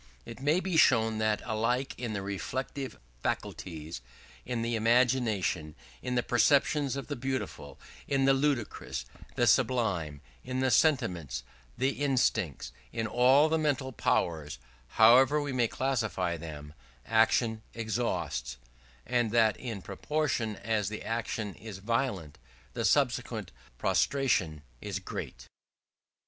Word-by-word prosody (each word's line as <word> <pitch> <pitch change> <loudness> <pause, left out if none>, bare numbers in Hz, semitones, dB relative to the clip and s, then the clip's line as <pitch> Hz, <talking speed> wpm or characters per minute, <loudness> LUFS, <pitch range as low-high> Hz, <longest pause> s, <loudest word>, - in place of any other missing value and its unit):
It 115 - -9
may 150 +5 +3
be 185 -3 -1
shown 110 -7 +4
that 110 -1 +1
alike 120 +4 0
in 120 -3 -4
the 100 -2 -3
reflective 130 +6 -4 0.2
faculties, 80 0 -4 0.5
in 120 -2 -2
the 115 0 -1
imagination, 115 -9 +1 0.3
in 125 - -2
the 120 - +2
perceptions 140 +2 +3
of 140 - -4
the 145 - -4
beautiful, 130 +1 -4 0.3
the 140 - +1 0.2
ludicrous, 130 - -1 0.3
the - - +2
sublime, 90 - +1 0.2
in 130 0 -3
the 130 0 +2
sentiments, 85 - +1 0.3
the 130 +3 +2
instincts, 115 - 0 0.2
in 115 -1 -2
all 130 +7 +5
the 160 0 +1
mental 140 -3 0
powers, 80 - 0 0.3
however 125 - +6
we 145 -2 -3
may 120 -2 +2
classify 110 -10 -1
them 75 -2 -8 0.3
action 110 0 +2
exhausts; 110 - -2 0.5
and 120 -2 +1
that 110 -2 +3
in 115 -7 -6
proportion 115 0 -1
as 105 0 -1
the 110 - -6
action 115 -2 -3
is 110 -3 -9
violent, 100 - -2 0.3
the - - -2
subsequent - - +1 0.3
prostration 95 - +1 0.2
is 100 -2 -3
great. 95 - -7
115 Hz, 125 wpm, -30 LUFS, 100-130 Hz, 0.5 s, however